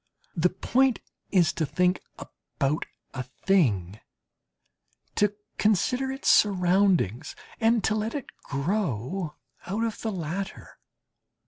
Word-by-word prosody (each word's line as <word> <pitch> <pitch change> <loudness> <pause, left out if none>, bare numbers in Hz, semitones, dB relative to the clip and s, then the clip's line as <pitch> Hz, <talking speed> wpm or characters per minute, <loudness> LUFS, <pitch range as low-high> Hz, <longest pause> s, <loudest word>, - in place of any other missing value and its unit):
The 175 +1 +3
point 250 +7 +2 0.3
is 180 -4 +4
to 165 - -1
think 180 +4 +1 0.2
about 140 +3 -3 0.3
a 130 - -3
thing, 125 - +1 1.1
to 205 0 +2 0.2
consider 250 +6 +2
its 270 - -5
surroundings, 180 - +3 0.2
and 225 -1 +3
to 220 - +2
let 215 +3 -2
it 285 - -3 0.2
grow 150 - -2 0.3
out 205 +5 -1
of 225 -2 -3
the 220 - -1
latter. 190 +2 -5
190 Hz, 110 wpm, -27 LUFS, 155-215 Hz, 1.1 s, is